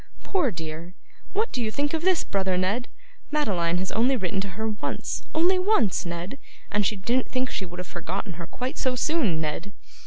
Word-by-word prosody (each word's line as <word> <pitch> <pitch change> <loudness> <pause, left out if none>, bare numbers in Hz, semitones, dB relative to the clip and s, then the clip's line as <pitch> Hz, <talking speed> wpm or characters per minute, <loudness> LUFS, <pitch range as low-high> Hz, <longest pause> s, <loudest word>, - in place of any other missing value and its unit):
'Poor 360 -9 +2
dear! 165 -1 -6 0.4
what 430 +3 +1
do 250 - -1
you 220 - +1
think 290 +6 0
of 320 - +1
this, 370 0 +3
brother 190 -2 +1
Ned? 205 +8 +1 0.4
Madeline 180 - +2
has 185 +1 -1
only 250 +4 +3
written 190 -1 0
to 200 - -3
her 220 0 0
once, 210 -1 -3
only 355 +4 +5
once, 365 - +3
Ned, 175 +10 -4 0.3
and 210 0 +3
she 205 +2 +2
didn't 240 +6 +1
think 255 0 0
she 190 - -2
would 175 +1 -9
have 180 - -4
forgotten 180 +3 -4
her 170 - -5
quite 255 +5 -4
so 255 -1 +2
soon, 250 - +2
Ned. 160 +6 -3
210 Hz, 195 wpm, -27 LUFS, 180-270 Hz, 0.4 s, only